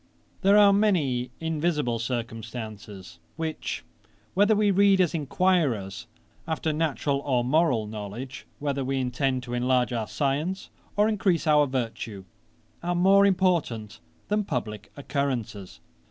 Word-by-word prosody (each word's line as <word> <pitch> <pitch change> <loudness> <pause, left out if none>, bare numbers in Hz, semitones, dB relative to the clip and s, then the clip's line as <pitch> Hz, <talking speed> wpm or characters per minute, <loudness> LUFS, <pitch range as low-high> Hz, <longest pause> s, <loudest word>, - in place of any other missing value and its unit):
'There 200 +1 +5
are 205 -1 +7
many 155 -12 +1
invisible 155 -7 -1
circumstances, 110 -4 -6 0.2
which 160 -1 -4 0.5
whether 205 +3 +4
we 205 -1 +3
read 195 0 +4
as 180 -3 +3
enquirers 140 - 0 0.4
after 160 -1 -1
natural 150 -2 0
or 130 -4 0
moral 130 -5 +2
knowledge, 110 +5 -7
whether 140 -2 -2
we 135 +1 -1
intend 130 0 -1
to 120 0 -6
enlarge 125 0 +1
our 115 -3 -2
science, 150 +7 -2 0.2
or 210 +1 +4
increase 195 -6 +1
our 150 -2 +4
virtue, 115 -6 -4 0.6
are 175 +1 -1
more 195 +3 +5
important 170 - 0 0.3
than 210 0 +1
publick 110 - -4
occurrences. 130 -9 -3
140 Hz, 125 wpm, -26 LUFS, 120-175 Hz, 0.6 s, are